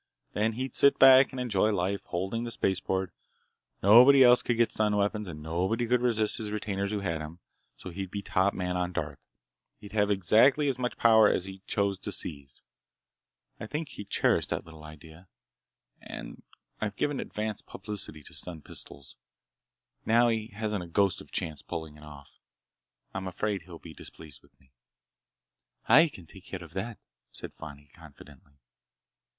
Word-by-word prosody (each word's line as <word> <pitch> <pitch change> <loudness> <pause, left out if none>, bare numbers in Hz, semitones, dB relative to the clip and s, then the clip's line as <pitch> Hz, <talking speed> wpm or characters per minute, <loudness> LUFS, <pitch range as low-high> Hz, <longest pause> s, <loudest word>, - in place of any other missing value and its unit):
Then 110 +2 0
he'd 130 +3 -4
sit 140 - +5
back 130 0 +8
and 130 - -7
enjoy 110 -4 +1
life. 100 -1 -1
Holding 95 +6 -3
the 120 - -4
spaceport, 95 -3 -1 0.7
nobody 125 +7 +8
else 125 0 +6
could 120 - -1
get 120 -1 +3
stun 105 -1 +1
weapons, 105 0 -1
and 75 -3 -8
nobody 95 +9 -1
could 120 +1 +2
resist 110 -3 +1
his 110 -2 -4
retainers 100 -2 -3
who 105 -1 -2
had 85 -5 -2
'em. 80 +2 -8 0.4
So 90 - -9
he'd 95 +1 -5
be 100 +1 -5
top 95 +2 +1
man 90 -1 -2
on 90 0 -2
Darth. 75 -5 -4 0.6
He'd 105 - -12
have 105 -1 +1
exactly 110 - +4
as 130 -2 -2
much 125 -1 -2
power 110 -2 +6
as 90 - 0
he 95 0 -9
chose 100 -2 0
to - - -5
seize. 70 -4 -7 1.0
I 110 - -6
think 150 +4 -4
he - - -8
cherished 100 - +1
that - - -3
little 80 -1 -13
idea,—and 80 +3 -13 0.4
I've 105 -2 -3
given 145 +4 -1
advance 110 0 -4
publicity 95 -6 -6
to - - -13
stun 85 -4 -8
pistols. 70 -1 -10 0.9
Now 120 +2 +4
he 110 -1 -1
hasn't 105 -2 -3
a - - -9
ghost 95 +2 +1
of - - -13
a - - -26
chance 80 -2 -3
of - - -32
pulling 80 -2 -6
it 75 - -15
off. 75 -2 -14 0.7
I'm 95 0 -4
afraid 100 +2 -2
he'll 85 0 -11
be 80 0 -12
displeased 75 -4 -11
with - - -28
me." 65 - -28 1.2
"I 150 +8 +7
can 95 - -12
take 95 +3 -15
care 95 -2 -7
of 85 -1 -13
that!" 105 +5 -4 0.3
said - - -8
Fani 75 -2 -11
confidently. 75 -3 -16
100 Hz, 175 wpm, -28 LUFS, 85-110 Hz, 1.2 s, back